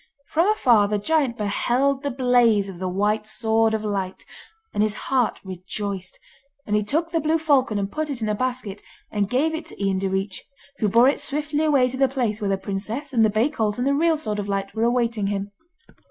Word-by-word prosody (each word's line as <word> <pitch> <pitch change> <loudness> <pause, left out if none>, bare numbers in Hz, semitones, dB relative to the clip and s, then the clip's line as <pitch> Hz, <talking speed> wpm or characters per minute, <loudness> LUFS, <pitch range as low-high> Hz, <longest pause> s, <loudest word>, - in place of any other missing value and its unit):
From 330 +4 +2
afar 240 - +4
the 210 0 0
giant 265 +1 0
beheld 250 +6 +1
the 285 - -2
blaze 245 -5 +3
of 180 -3 -9
the 185 -1 -2
White 210 +3 0
Sword 220 0 +1
of 215 - -3
Light, 195 -3 -3 0.5
and - - 0
his 215 0 +1
heart 255 0 0
rejoiced; 190 +1 -5 0.5
and 210 - 0
he 210 - +3
took 320 +11 -1
the 330 - +1
blue 315 +1 +1
falcon 275 -8 +2
and 200 0 -2
put 310 0 -3
it 275 -4 -3
in 220 - -2
a 210 - +1
basket, 245 -3 -3 0.3
and 205 -2 -1
gave 290 +7 +1
it 320 0 -5
to - - -12
Ian 195 -1 0
Direach, 190 0 -2 0.4
who 215 - +2
bore 235 +5 +5
it 280 - +2
swiftly 300 +1 -2
away 280 -5 +4
to 255 +1 -5
the 270 0 +4
place 240 -5 -1
where 200 - -1
the 195 - +1
princess, 215 +9 -4
and 230 -2 +4
the 220 - +4
bay 215 +5 +2
colt, 215 -7 -1
and 245 - -1
the 280 - +2
real 320 +2 +2
Sword 215 -8 -3
of 205 0 -4
Light 195 0 -2
were 225 +1 0
awaiting 235 -4 +1
him. 200 0 -3
225 Hz, 220 wpm, -23 LUFS, 205-275 Hz, 0.5 s, bore